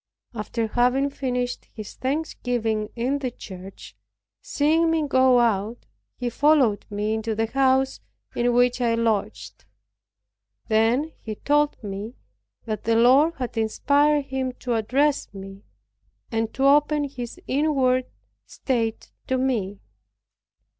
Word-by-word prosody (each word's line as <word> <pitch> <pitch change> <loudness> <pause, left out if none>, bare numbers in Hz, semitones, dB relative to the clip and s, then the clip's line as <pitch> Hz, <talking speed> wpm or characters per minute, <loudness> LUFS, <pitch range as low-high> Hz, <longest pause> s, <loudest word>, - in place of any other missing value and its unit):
After 225 +1 -3
having 250 +5 +1
finished 250 -2 -3
his 215 -3 -10
thanksgiving 245 -6 -2
in 255 +4 -1
the 260 -2 -2
church, 190 -4 -11 0.5
seeing 320 +3 +2
me 320 -2 +1
go 260 -2 +4
out, 225 0 0 0.3
he 245 - -4
followed 270 -7 +3
me 210 +1 -2
into 220 0 -2
the 225 +1 0
house 265 +2 +1 0.4
in 240 0 +1
which 245 +1 +2
I 230 -1 +2
lodged. 200 - -2 1.1
Then 230 +8 +2
he 215 -1 -6
told 295 +5 +1
me 205 +4 -6 0.5
that 215 -2 -4
the 225 0 +2
Lord 265 +8 +5
had 250 -2 -5
inspired 285 +6 +2
him 260 -1 -3
to 245 -1 -4
address 270 +6 +1
me, 195 0 -9 0.7
and 225 -1 -1
to 265 - -1
open 295 +1 +4
his 260 -4 -6
inward 260 -3 +1 0.4
state 230 -4 -2 0.2
to 260 - +1
me. 220 -7 -1
245 Hz, 125 wpm, -24 LUFS, 220-275 Hz, 1.1 s, Lord